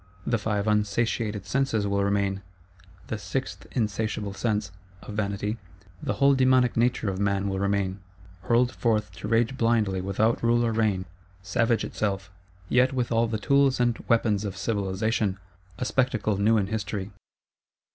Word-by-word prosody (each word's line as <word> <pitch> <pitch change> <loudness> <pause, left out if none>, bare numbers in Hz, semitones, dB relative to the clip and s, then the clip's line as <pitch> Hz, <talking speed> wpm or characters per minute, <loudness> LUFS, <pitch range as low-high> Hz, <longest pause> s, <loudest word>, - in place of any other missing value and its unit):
The 115 -2 +1
five 105 0 -1
unsatiated 105 0 0
Senses 115 -1 0
will 100 0 +1
remain, 100 -1 0 0.6
the 110 - -4
sixth 135 +5 -4
insatiable 110 -3 -1
Sense 105 -2 -1 0.3
(of 105 - -8
vanity); 105 +1 -2 0.4
the - - -1
whole 140 0 +4
dæmonic 130 -2 +3
nature 115 -3 +1
of 95 - -5
man 100 -1 +1
will 95 -1 -2
remain,—hurled 95 +3 -1
forth 110 -6 0
to 95 - -5
rage 115 +4 +1
blindly 110 -5 +2
without 100 +5 +1
rule 120 0 +3
or 115 - +1
rein; 105 -4 +1 0.4
savage 115 +5 +1
itself, 95 -3 -3 0.4
yet 130 +4 +3
with 125 -2 -1
all 115 0 +3
the 110 -1 -2
tools 140 +3 +3
and 120 -1 +1
weapons 110 -3 +2
of 100 -3 -4
civilisation; 100 -1 -1 0.4
a 125 - -2
spectacle 125 -5 +1
new 105 +3 +3
in 100 - +1
History. 100 -1 -4
110 Hz, 145 wpm, -26 LUFS, 100-115 Hz, 0.6 s, whole